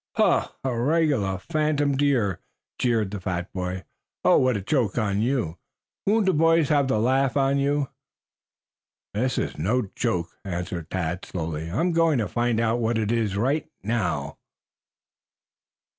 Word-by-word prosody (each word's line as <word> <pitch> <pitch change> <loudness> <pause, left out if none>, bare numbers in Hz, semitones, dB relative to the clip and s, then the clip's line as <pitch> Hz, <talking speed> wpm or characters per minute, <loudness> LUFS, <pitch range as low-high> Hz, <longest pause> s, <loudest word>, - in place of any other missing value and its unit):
"A - - +3 0.2
regular 130 - +1
phantom 150 - 0
deer," 130 -10 +1 0.4
jeered 115 -5 +1
the 105 - -4
fat 90 -1 -3
boy. 90 0 -3 0.4
"Oh, - - +6
what 130 -4 +2
a - - -4
joke 115 0 0
on 105 -3 +1
you. 115 -9 -1 0.5
Won't 215 +1 +3
the 190 - +3
boys 165 -1 +4
have 145 -2 +3
the 130 - +1
laugh 130 +4 +2
on 135 0 +2
you?" 140 0 +1 1.3
"This 125 +4 0
is - - -2
no 105 +5 0
joke," 85 -2 -1
answered 90 -3 -4
Tad 90 -1 -2
slowly. 80 -2 -4
"I'm 165 - +1
going 165 -3 +3
to 110 -4 0
find 120 -1 0
out 115 +1 +1
what 115 0 +1
it 110 -1 0
is 110 -4 0
right 135 +8 0
now." 115 +2 -2
120 Hz, 145 wpm, -25 LUFS, 95-140 Hz, 1.3 s, Oh